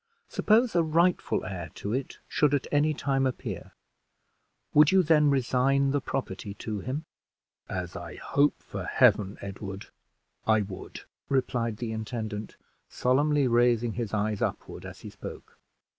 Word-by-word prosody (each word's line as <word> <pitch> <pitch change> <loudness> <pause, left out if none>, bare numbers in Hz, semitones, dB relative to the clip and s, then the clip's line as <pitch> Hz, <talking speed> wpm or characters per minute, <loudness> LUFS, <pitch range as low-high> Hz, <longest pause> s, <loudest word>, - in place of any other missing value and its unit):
Suppose 225 +1 +3
a 170 - +5
rightful 165 +3 +2
heir 90 -5 -5
to 105 - -4
it 130 +1 -3
should 145 -1 +3
at 140 - -1
any 150 +1 +3
time 135 -2 +1
appear, 130 - -5 1.0
would 150 +2 +7
you 190 -1 +5
then 150 -2 +5
resign 135 +1 +2
the 145 0 +1
property 100 -7 -4
to 105 -1 -4
him?" 135 - -4 0.6
"As 90 -2 -4
I - - -7
hope 145 +1 +1
for - - -6
Heaven, 100 -1 +3
Edward, 100 0 -7 0.6
I 110 -1 +5
would!" 95 -2 -7 0.3
replied 120 -4 0
the 115 -1 -4
intendant, 110 -1 -5 0.3
solemnly 145 +2 +2
raising 120 -1 +3
his 115 -2 -3
eyes 105 -1 -1
upward - - -3
as - - -11
he - - -8
spoke. - - -10
125 Hz, 145 wpm, -28 LUFS, 105-145 Hz, 1.0 s, would